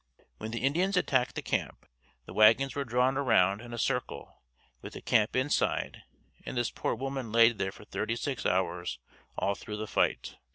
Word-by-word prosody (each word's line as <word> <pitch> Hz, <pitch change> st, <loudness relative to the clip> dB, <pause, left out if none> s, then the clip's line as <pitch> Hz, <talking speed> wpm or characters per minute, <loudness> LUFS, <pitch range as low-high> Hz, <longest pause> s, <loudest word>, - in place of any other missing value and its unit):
When 110 Hz, -, -5 dB
the 115 Hz, +2 st, -4 dB
Indians 180 Hz, +8 st, +1 dB
attacked 130 Hz, -7 st, +1 dB
the -, -, -4 dB
camp, -, -, -3 dB, 0.4 s
the -, -, -10 dB
wagons 115 Hz, +6 st, +5 dB
were 140 Hz, -, -2 dB
drawn 125 Hz, +1 st, +1 dB
around 105 Hz, -7 st, +3 dB
in 120 Hz, 0 st, -10 dB
a 120 Hz, -, -5 dB
circle 125 Hz, -, -3 dB, 0.4 s
with -, -, -9 dB
the -, -, -8 dB
camp 105 Hz, 0 st, +2 dB
inside 130 Hz, +3 st, 0 dB, 0.4 s
and 130 Hz, -, -6 dB
this 120 Hz, -, 0 dB
poor -, -, -2 dB
woman 135 Hz, -2 st, -4 dB
laid 115 Hz, -1 st, +5 dB
there 95 Hz, -, -1 dB
for 105 Hz, -, -14 dB
thirty 110 Hz, +2 st, -2 dB
six 130 Hz, +2 st, -3 dB
hours 90 Hz, -1 st, -1 dB, 0.4 s
all 100 Hz, -, +1 dB
through 105 Hz, +1 st, -7 dB
the 110 Hz, -, -4 dB
fight. -, -, -1 dB
120 Hz, 180 wpm, -30 LUFS, 105-135 Hz, 0.4 s, wagons